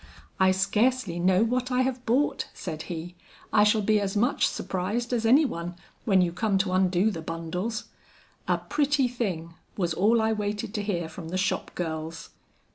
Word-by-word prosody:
"I 190 0 +5
scarcely 200 +1 +1
know 185 +3 +4
what 250 +2 -1
I 250 0 +3
have 255 -1 -3
bought," 265 +6 +1
said 155 0 -5
he. 175 0 -5 0.4
"I 210 - +6
shall 210 0 +3
be 215 +1 +3
as 200 0 -2
much 245 +6 +2
surprised 200 +7 -2
as 230 -2 +1
any 280 +7 +6
one, 175 -7 -4 0.3
when 190 -4 +4
you 175 - 0
come 200 +2 0
to 190 -1 0
undo 185 +2 +3
the 165 -5 -5
bundles. 170 +7 -3 0.6
'A - - +2
pretty 290 -2 +2
thing,' 185 -9 -3 0.2
was 175 -4 0
all 215 +7 +3
I 220 0 +2
waited 210 0 -3
to 210 - -1
hear 180 -5 -2
from 160 +1 -9
the 185 - -2
shop 195 +1 -1
girls." 160 -1 -5
200 Hz, 180 wpm, -27 LUFS, 175-230 Hz, 0.6 s, I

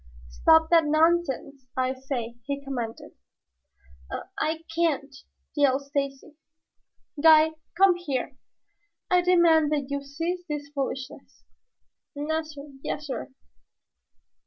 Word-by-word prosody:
"Stop 320 - +4
that 330 -2 +6
nonsense, 310 -4 +1
I 255 0 +1
say!" 260 -3 -5
he 280 0 -2
commanded. 250 -5 -5 1.0
"I - - -3 0.2
I 315 +1 -1
can't," 295 -4 0 0.4
yelled 280 -2 +3
Stacy. 280 +1 -3 0.9
"Guide, 315 0 +7 0.3
come 385 0 +6
here! 280 -6 -3 0.8
I 360 0 +5
demand 340 -4 +4
that 285 -2 -2
you 280 0 -1
cease 330 +6 -4
this 290 -1 -4
foolishness." 270 -2 -5 0.7
"Nassir, 300 -1 -4
yassir." 280 -3 -4
290 Hz, 100 wpm, -26 LUFS, 275-320 Hz, 1.0 s, Guide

